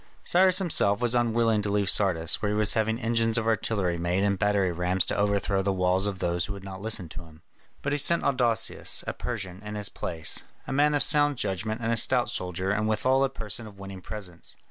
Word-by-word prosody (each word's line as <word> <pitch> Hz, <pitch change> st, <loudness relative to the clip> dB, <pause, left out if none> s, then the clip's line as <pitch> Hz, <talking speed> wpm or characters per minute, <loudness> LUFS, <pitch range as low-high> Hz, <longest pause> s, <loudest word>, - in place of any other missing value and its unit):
Cyrus 185 Hz, 0 st, +4 dB
himself 125 Hz, -, +1 dB
was 120 Hz, -1 st, 0 dB
unwilling 115 Hz, -2 st, +2 dB
to 105 Hz, -, -3 dB
leave 100 Hz, -1 st, 0 dB
Sardis, 90 Hz, -5 st, +2 dB
where 105 Hz, -, 0 dB
he 105 Hz, -, -1 dB
was 105 Hz, -1 st, +3 dB
having 110 Hz, 0 st, 0 dB
engines 115 Hz, -1 st, 0 dB
of 115 Hz, -, -1 dB
artillery 100 Hz, -6 st, 0 dB
made 90 Hz, +3 st, 0 dB
and 100 Hz, -2 st, 0 dB
battering 100 Hz, -3 st, +1 dB
rams 90 Hz, +2 st, 0 dB
to -, -, -2 dB
overthrow 100 Hz, -1 st, 0 dB
the 100 Hz, +1 st, 0 dB
walls 95 Hz, +1 st, +1 dB
of 100 Hz, -2 st, -3 dB
those 85 Hz, -1 st, -1 dB
who 100 Hz, -, -5 dB
would 100 Hz, -1 st, -10 dB
not 95 Hz, -1 st, -8 dB
listen 110 Hz, -4 st, 0 dB
to 80 Hz, +2 st, -9 dB
him. 80 Hz, -1 st, -18 dB, 0.4 s
But 145 Hz, -, -1 dB
he 145 Hz, -, 0 dB
sent 170 Hz, +4 st, +2 dB
Adousius, 120 Hz, -5 st, +2 dB
a -, -, -3 dB
Persian, 100 Hz, -6 st, -6 dB
in 105 Hz, 0 st, -7 dB
his 105 Hz, -1 st, +1 dB
place, 80 Hz, -2 st, 0 dB, 0.2 s
a -, -, -5 dB
man 145 Hz, +2 st, +3 dB
of 145 Hz, -, +3 dB
sound 145 Hz, -2 st, +3 dB
judgment 105 Hz, +2 st, -3 dB
and 115 Hz, 0 st, -1 dB
a 115 Hz, -, +2 dB
stout 125 Hz, +2 st, +3 dB
soldier 90 Hz, +1 st, -3 dB
and 110 Hz, +1 st, 0 dB
withal 130 Hz, +5 st, +2 dB
a 135 Hz, -, +1 dB
person 115 Hz, -3 st, -7 dB
of 100 Hz, -2 st, -14 dB
winning 95 Hz, -1 st, -9 dB
presence. 90 Hz, -4 st, -7 dB
105 Hz, 225 wpm, -26 LUFS, 95-115 Hz, 0.4 s, Cyrus